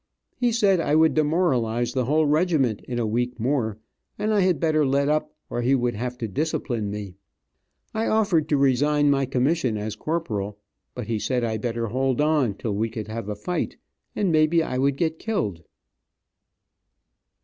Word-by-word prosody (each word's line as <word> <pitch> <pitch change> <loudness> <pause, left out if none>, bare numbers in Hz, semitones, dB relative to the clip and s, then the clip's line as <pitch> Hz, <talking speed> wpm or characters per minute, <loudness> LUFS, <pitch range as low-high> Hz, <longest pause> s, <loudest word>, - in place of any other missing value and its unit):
He 245 -1 +1
said 200 -5 +3
I 150 -2 +1
would 160 0 +5
demoralize 135 -8 +1
the 130 -2 0
whole 155 +4 +2
regiment 150 - +2
in 125 - -3
a 120 - 0
week 120 +3 -1
more, 115 -3 0 0.4
and 215 +1 0
I 190 -3 +4
better 155 -2 +1
let 140 +1 +2
up 155 0 -1
or 120 - -3
he 130 +3 +3
would 120 -2 0
have 125 +3 -4
to 115 - -3
discipline 120 -3 -2
me. 100 -2 -6 0.8
I 220 +1 -1
offered 200 -8 +2
to 145 - +3
resign 145 +2 +3
my 135 -1 +1
commission 130 -2 +1
as 105 0 -4
Corporal, 105 -12 -3 0.4
but 125 - -5
he 110 0 -2
said 125 +2 -1
I 110 -1 -1
better 115 +1 -2
hold 130 +3 0
on 150 -8 +2
till 105 +1 -3
we 110 +3 -1
could 110 -1 -6
have 110 -1 -5
a 105 - -3
fight, 175 +13 -3 0.4
and 195 -4 +1
may 155 -1 +4
be 165 +1 +2
I 125 - -3
would 140 +1 +2
get 160 0 -1
killed. 105 - -2
135 Hz, 180 wpm, -24 LUFS, 115-155 Hz, 0.8 s, would